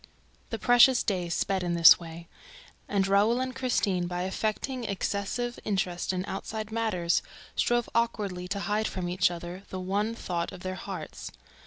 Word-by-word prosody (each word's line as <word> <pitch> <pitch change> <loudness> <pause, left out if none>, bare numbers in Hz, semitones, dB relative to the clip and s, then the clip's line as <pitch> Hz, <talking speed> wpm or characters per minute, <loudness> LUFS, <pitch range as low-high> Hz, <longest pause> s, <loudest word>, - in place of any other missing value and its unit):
The 225 - -3
precious 245 +2 +6
days 180 -4 -1
sped 195 -1 0
in 175 -1 -1
this 170 -1 +9
way; 170 0 -9 0.6
and 195 -1 +1
Raoul 205 +5 +3
and 260 0 -3
Christine, 205 -9 0
by 175 0 -3
affecting 220 +6 -2
excessive 205 +4 -2
interest 185 -4 -1
in 185 0 -2
outside 215 +2 -5
matters, 215 -7 +1 0.3
strove 240 -1 +1
awkwardly 205 -6 -1
to 200 +2 -3
hide 215 +2 0
from 180 -1 -4
each 180 +1 +2
other 175 +1 -7
the 185 - -5
one 205 +5 -1
thought 170 -6 -3
of 185 -2 -10
their 185 0 -3
hearts. 185 - -7
195 Hz, 160 wpm, -28 LUFS, 180-225 Hz, 0.6 s, this